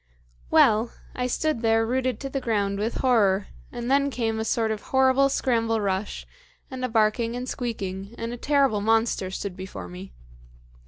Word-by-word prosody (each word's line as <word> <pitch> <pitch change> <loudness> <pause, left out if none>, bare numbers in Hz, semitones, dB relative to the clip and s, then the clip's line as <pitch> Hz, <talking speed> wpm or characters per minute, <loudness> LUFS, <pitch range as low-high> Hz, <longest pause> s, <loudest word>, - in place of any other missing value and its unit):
"Well, 220 - +4 0.2
I 250 0 -2
stood 305 0 -1
there 225 -1 +3
rooted 255 -1 -1
to 275 - -4
the 275 - -2
ground 200 -4 0
with 220 +3 -2
horror; 205 -6 +3 0.2
and 240 +1 -4
then 280 +1 +3
came 225 -4 -2
a - - -1
sort 225 0 +1
of 215 -1 -3
horrible 265 +1 +3
scramble 230 -4 +1
rush, 195 0 -2 0.5
and 260 -1 -5
a 255 - 0
barking 225 +1 +1
and 250 +1 -4
squeaking, 200 -4 -4
and 230 +1 -4
a - - -5
terrible 275 -5 +2
monster 225 -3 +1
stood 190 0 -5
before 185 - -7
me. 90 +2 -9
225 Hz, 170 wpm, -25 LUFS, 205-255 Hz, 0.5 s, Well